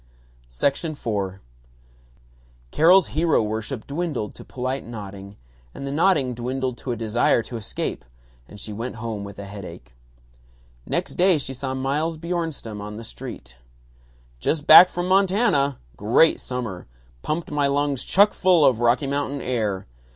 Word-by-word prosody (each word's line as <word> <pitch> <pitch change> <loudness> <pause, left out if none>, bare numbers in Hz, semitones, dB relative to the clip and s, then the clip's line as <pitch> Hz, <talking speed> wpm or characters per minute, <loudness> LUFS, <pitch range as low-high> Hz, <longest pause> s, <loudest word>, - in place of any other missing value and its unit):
IV 140 - -1 1.7
Carol's 180 +4 +5
hero 160 -5 +2
worship 110 +3 -4
dwindled 145 -8 -3
to - - -12
polite 130 +1 -4
nodding, 100 -3 -9 0.4
and 140 - -6
the 140 - -3
nodding 150 -5 +2
dwindled 125 +1 -3
to 130 - -4
a - - -1
desire 115 +1 +1
to 120 - -8
escape, 110 -2 -4 0.4
and 105 - -12
she 105 +1 -6
went 115 +4 -5
home 110 -3 -5
with 100 -1 -9
a 100 - -7
headache. 90 -11 -10 0.9
Next - - -2
day 180 -1 +4
she 135 -2 -4
saw 130 0 -4
Miles 150 +5 -1
Bjornstam 160 -10 -4
on 105 +1 -7
the 115 - -8
street. 60 - -9 0.8
"Just 150 - -1
back 180 +2 +10
from 175 0 -3
Montana. 185 - +2 0.2
Great 115 +10 +4
summer. 120 - -5 0.3
Pumped 160 +1 -3
my 145 -1 +1
lungs 140 -1 0
chuck 205 +2 +4
full 180 -5 +4
of 120 -4 +3
Rocky 120 +4 +3
Mountain 140 0 -2
air. 110 -6 -2
130 Hz, 145 wpm, -23 LUFS, 110-155 Hz, 1.7 s, back